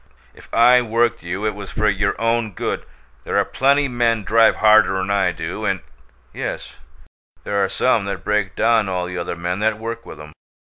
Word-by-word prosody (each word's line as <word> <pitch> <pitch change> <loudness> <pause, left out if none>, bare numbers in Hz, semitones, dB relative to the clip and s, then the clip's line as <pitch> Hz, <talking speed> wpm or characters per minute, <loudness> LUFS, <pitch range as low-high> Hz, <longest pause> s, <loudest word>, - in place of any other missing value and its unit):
If - - -18
I 125 +2 +5
worked 115 0 0
you 90 +5 -4
it 105 - 0
was 100 -1 -9
for 105 - -1
your 100 0 0
own 115 -2 0
good. - - -4 0.4
There - - -2
are - - +3
plenty 140 +2 +2
men 120 -3 0
drive 115 +2 +4
harder'n 100 -3 +3
I 100 -1 +2
do, 85 +6 -6
and 95 -3 -1 0.3
" 60 +1 -35
"Yes. - - -6 0.7
There 100 -1 0
are 95 - 0
some 110 0 +1
that 100 0 -5
break 105 -3 -1
down 110 -3 +2
all 90 -1 -2
the 90 0 -5
other 85 - -4
men 90 +2 -3
that 110 0 0
work 115 +1 -6
with - - -11
'em. 75 0 -11
105 Hz, 195 wpm, -20 LUFS, 95-115 Hz, 0.7 s, I